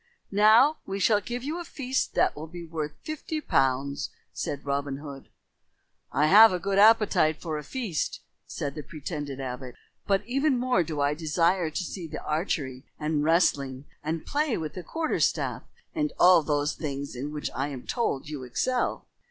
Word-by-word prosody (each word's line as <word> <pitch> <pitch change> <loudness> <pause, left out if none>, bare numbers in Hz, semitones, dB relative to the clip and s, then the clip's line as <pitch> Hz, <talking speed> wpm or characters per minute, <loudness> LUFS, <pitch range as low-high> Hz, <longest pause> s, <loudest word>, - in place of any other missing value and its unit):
"Now 220 +9 +6
we 195 - -3
shall 205 +1 +3
give 245 +3 -5
you 310 +5 -3
a - - -4
feast 265 -5 -2
that - - +3
will 155 +2 -7
be 170 +1 -8
worth 155 -2 -4
fifty 310 0 -4
pounds," 135 - 0 0.2
said 145 0 -4
Robin 140 -1 -1
Hood. 140 -2 -9 0.8
"I 145 +3 +2
have 215 +7 +9
a 180 - 0
good 195 +2 0
appetite 210 -8 +5
for 155 -2 -3
a - - -8
feast," 220 - -3 0.3
said 140 -1 -4
the 150 - -6
pretended 145 -2 -6
abbot, 125 -1 -6 0.3
"but 195 0 +2
even 270 +3 +1
more 250 -5 +2
do 155 -3 -3
I 145 +1 +2
desire 165 +2 +1
to 155 - -3
see 175 0 -6
the 150 - -7
archery 145 -5 -2 0.2
and 150 -1 0
wrestling 140 -5 +2 0.2
and 160 +1 -3
play 290 -4 0
with 155 -2 -4
the 185 - -6
quarter 320 - -2
staff - - 0 0.3
and 300 -3 0
all 180 -1 +7
those 145 -1 0
things 140 -3 -5
in 140 +4 -4
which 150 -1 -4
I 135 +3 -1
am 135 -4 -7
told 230 - -1
you 150 -3 -5
excel." 245 - -1
160 Hz, 175 wpm, -27 LUFS, 145-215 Hz, 0.8 s, have